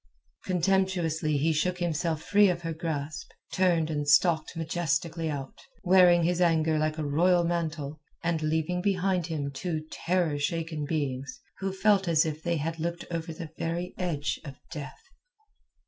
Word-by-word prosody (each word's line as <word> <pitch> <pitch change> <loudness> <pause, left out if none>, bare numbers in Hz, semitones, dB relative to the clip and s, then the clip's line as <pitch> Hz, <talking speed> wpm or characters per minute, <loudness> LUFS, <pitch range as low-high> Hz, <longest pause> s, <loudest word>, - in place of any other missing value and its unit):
Contemptuously 175 -4 +1
he 160 +3 +2
shook 180 +4 0
himself 165 -2 -1
free 205 -1 +5
of 175 -1 -2
her 165 -1 -2
grasp, 155 -2 -4 0.2
turned 170 -4 +2
and 145 -1 -2
stalked 160 +2 +3
majestically 165 0 -1
out, 140 -3 -6 0.2
wearing 180 -2 +6
his 175 +1 +1
anger 160 -2 +3
like 155 +1 0
a 155 - -2
royal 175 +5 +3
mantle, 155 -4 -2 0.2
and 165 -1 0
leaving 160 +3 0
behind 185 -3 +1
him 145 -4 -3
two 155 +2 -3
terror 170 -4 0
shaken 160 0 -2
beings, 145 - -3 0.2
who 195 0 -2
felt 195 0 +3
as 165 0 +4
if 155 -1 -3
they 170 0 0
had 165 +2 -3
looked 170 +1 -3
over 165 -1 -3
the 160 -1 -8
very 170 +2 -2
edge 155 -5 -1
of 140 -3 -8 0.2
death. 145 -5 -7
165 Hz, 155 wpm, -28 LUFS, 155-175 Hz, 0.2 s, wearing